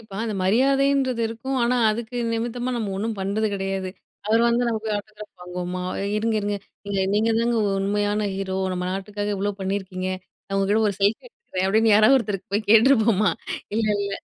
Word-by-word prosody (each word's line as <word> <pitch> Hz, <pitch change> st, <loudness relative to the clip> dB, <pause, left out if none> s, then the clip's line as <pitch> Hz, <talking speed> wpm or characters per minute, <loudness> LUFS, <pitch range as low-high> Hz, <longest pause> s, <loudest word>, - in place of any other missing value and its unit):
இப்ப 215 Hz, -3 st, -17 dB
அந்த 215 Hz, -2 st, -3 dB
மரியாதைன்றது 270 Hz, +3 st, +2 dB
இருக்கும். 260 Hz, +4 st, -4 dB
ஆனா, 245 Hz, +1 st, +2 dB
அதுக்கு 235 Hz, +2 st, -4 dB, 0.2 s
நிமித்தமா 240 Hz, +2 st, -2 dB
நம்ம 215 Hz, -4 st, -2 dB
ஒண்ணும் 220 Hz, +1 st, -2 dB
பண்றது 210 Hz, +3 st, 0 dB
கிடையாது. 195 Hz, -1 st, -3 dB, 0.4 s
அவரு 225 Hz, +2 st, +3 dB
வந்து 240 Hz, +1 st, +2 dB
நமக்கு 220 Hz, -1 st, -2 dB
ஆட்டோகிராப் 210 Hz, -2 st, -10 dB
வாங்குவோமா! 180 Hz, 0 st, -5 dB, 0.3 s
இருங்க, 220 Hz, +1 st, 0 dB
இருங்க. 205 Hz, 0 st, -1 dB, 0.3 s
நீங்க 200 Hz, -1 st, -1 dB
நீங்கதாங்க 230 Hz, +2 st, +2 dB, 0.2 s
உண்மையான 205 Hz, +1 st, 0 dB
ஹீரோ, 190 Hz, -1 st, -3 dB, 0.2 s
நம்ம 180 Hz, 0 st, -3 dB
நாட்டுக்காக 205 Hz, +2 st, -3 dB
இவ்ளோ 205 Hz, +1 st, -1 dB
பண்ணியிருக்கீங்க. 190 Hz, -1 st, -3 dB, 0.4 s
நான் 195 Hz, -, -3 dB
உங்ககிட்ட 205 Hz, +3 st, +2 dB
ஒரு 200 Hz, -, -2 dB
செல்ஃபி 200 Hz, +3 st, +2 dB
எடுத்துக்கிறேன் 190 Hz, -, -4 dB
அப்பிடின்னு 220 Hz, +2 st, +4 dB
யாராவது 215 Hz, +6 st, +6 dB
ஒருத்தருக்கு 200 Hz, -4 st, -5 dB
போய் 210 Hz, 0 st, -1 dB
கேட்டுருப்போமா! 220 Hz, -4 st, +5 dB, 0.4 s
இல்லல்ல 205 Hz, -2 st, 0 dB
210 Hz, 155 wpm, -23 LUFS, 195-230 Hz, 0.4 s, யாராவது